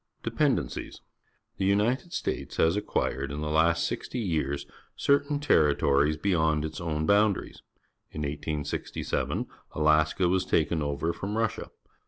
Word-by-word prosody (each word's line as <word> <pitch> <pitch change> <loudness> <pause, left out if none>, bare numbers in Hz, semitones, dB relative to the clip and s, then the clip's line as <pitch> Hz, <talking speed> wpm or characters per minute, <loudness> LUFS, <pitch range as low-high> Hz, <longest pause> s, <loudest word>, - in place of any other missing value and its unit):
Dependencies. - - -1 0.3
— - - -45
The 95 - +1
United 110 - +1
States - - -3
has 80 +3 +3
acquired 70 -8 -1
in 75 +1 -4
the 75 0 -2
last 80 +2 +3
sixty - - -4
years 75 - -1 0.3
certain 145 +1 +2
terri 80 - +3
tories 70 +2 +2
beyond 80 -4 +1
its 80 - -6
own 80 -2 -1
boundaries. 100 +1 +2 0.5
In 75 - -6
1867 75 0 -3 0.3
Alaska 80 +3 +3
was 95 +1 +2
taken 80 0 +1
o\er 75 +3 -1
from 105 +3 -4
Russia. 115 -2 -1
80 Hz, 135 wpm, -28 LUFS, 75-100 Hz, 0.5 s, has